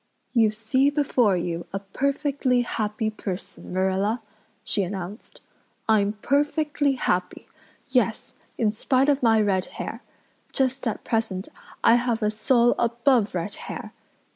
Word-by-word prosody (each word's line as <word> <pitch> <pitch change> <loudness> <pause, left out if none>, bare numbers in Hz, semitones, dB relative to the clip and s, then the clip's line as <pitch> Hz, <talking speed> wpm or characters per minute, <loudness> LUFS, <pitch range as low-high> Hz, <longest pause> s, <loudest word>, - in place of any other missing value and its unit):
"You 225 -3 +4
see 230 +6 +1
before 255 -9 +2
you 170 -1 -3
a 195 - -2
perfectly 265 +5 0
happy 215 -1 -2
person, 195 -3 -6
Marilla," 190 +5 0 0.4
she 205 - 0
announced. 190 +2 -6 0.5
"I'm 210 -2 +3
perfectly 290 0 +1
happy 180 -8 -1 0.4
yes, 250 -4 0 0.2
in 220 -2 +2
spite 255 +5 +2
of 285 -1 +2
my 225 -2 +4
red 195 -3 +1
hair. - - -5 0.5
Just 265 -1 0
at 220 - -3
present 220 -5 -2 0.3
I 235 - +7
have 240 -2 -1
a 210 - +2
soul 240 +2 +3
above 235 -2 +2
red 180 +4 -2 0.2
hair. - - -6
225 Hz, 130 wpm, -25 LUFS, 200-260 Hz, 0.5 s, I